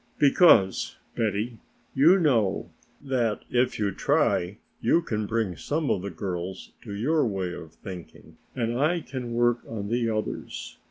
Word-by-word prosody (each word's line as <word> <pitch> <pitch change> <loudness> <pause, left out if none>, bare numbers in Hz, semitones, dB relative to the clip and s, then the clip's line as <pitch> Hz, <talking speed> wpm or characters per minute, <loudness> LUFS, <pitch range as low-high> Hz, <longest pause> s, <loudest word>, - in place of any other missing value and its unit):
"Because, 140 - +5 0.2
Betty, 110 +1 -1 0.3
you 160 +8 +6
know 115 - +1 0.3
that 120 -6 0
if 125 0 +2
you 105 -2 0
try 90 +1 +1 0.2
you 170 - +3
can 105 -7 -2
bring 110 -5 -1
some 150 - -1
of 90 - 0
the 100 - -4
girls 90 +1 -5
to 110 - -9
your 150 +9 +2
way 95 -4 -2
of 80 -2 -9
thinking 90 -2 -11 0.2
and 120 0 -1
I 165 +4 +2
can 125 -5 -5
work 120 0 +3
on 105 -3 -5
the 120 0 +1
others. 110 -1 -4
115 Hz, 150 wpm, -26 LUFS, 100-130 Hz, 0.3 s, you